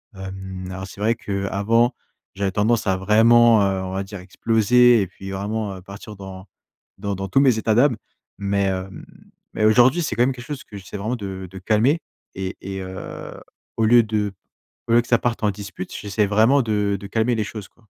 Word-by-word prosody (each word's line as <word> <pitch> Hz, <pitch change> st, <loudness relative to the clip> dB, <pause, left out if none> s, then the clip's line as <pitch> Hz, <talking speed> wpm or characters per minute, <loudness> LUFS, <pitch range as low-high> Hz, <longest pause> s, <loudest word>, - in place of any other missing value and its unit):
Hem, 95 Hz, -1 st, -7 dB
alors 95 Hz, +1 st, -6 dB
c'est 95 Hz, -, -13 dB
vrai 110 Hz, +2 st, +3 dB
qu'avant, 105 Hz, +3 st, 0 dB, 0.4 s
j'avais 100 Hz, -1 st, -1 dB
tendance 110 Hz, +2 st, +1 dB
à 95 Hz, -, +2 dB
vraiment, 115 Hz, +3 st, +5 dB
heu, 95 Hz, -1 st, 0 dB
on 95 Hz, -, -5 dB
va 95 Hz, +1 st, -2 dB
dire 100 Hz, 0 st, -9 dB
exploser 115 Hz, +5 st, +3 dB
et 95 Hz, -, -1 dB
puis 95 Hz, +1 st, -10 dB
vraiment, 100 Hz, +1 st, -3 dB
heu, -, -, -11 dB
partir 100 Hz, +2 st, -10 dB
dans 95 Hz, 0 st, -10 dB, 0.5 s
dans 100 Hz, 0 st, -2 dB
dans 95 Hz, +1 st, -4 dB
tous 135 Hz, -, +3 dB
mes 130 Hz, -5 st, +4 dB
états 110 Hz, 0 st, +1 dB
d'âme 125 Hz, +1 st, +4 dB, 0.4 s
mais 100 Hz, 0 st, 0 dB
hem, 95 Hz, 0 st, -4 dB, 0.5 s
mais 110 Hz, -, +1 dB
aujourd'hui, 125 Hz, +9 st, +5 dB
c'est 125 Hz, -, -2 dB
quand 120 Hz, -, +3 dB
même 130 Hz, -, +2 dB
quelque 125 Hz, -1 st, -10 dB
chose 145 Hz, -1 st, -6 dB
que 100 Hz, -, -10 dB
j'essaie 100 Hz, +1 st, -8 dB
vraiment 110 Hz, +5 st, -2 dB
de 95 Hz, -3 st, -6 dB
de 95 Hz, -, -9 dB
calmer 115 Hz, -, +2 dB, 0.3 s
et 95 Hz, 0 st, -5 dB
et 95 Hz, 0 st, -5 dB
heu, 95 Hz, 0 st, -8 dB, 0.4 s
au 115 Hz, -, +2 dB
lieu 120 Hz, +2 st, +7 dB
de 105 Hz, -2 st, -2 dB, 0.5 s
au 115 Hz, -, +1 dB
lieu 120 Hz, -, +6 dB
que 120 Hz, -, -14 dB
ça 120 Hz, -, +3 dB
parte 120 Hz, -2 st, -2 dB
en 105 Hz, -, +3 dB
dispute, 95 Hz, -2 st, -8 dB
j'essaie 105 Hz, +1 st, 0 dB
vraiment 110 Hz, +7 st, +4 dB
de 105 Hz, -3 st, 0 dB
de 100 Hz, -, -8 dB
calmer 115 Hz, +4 st, +1 dB
les 110 Hz, -, 0 dB
choses 105 Hz, -1 st, -8 dB
quoi. 115 Hz, -, -29 dB
105 Hz, 205 wpm, -22 LUFS, 95-115 Hz, 0.5 s, lieu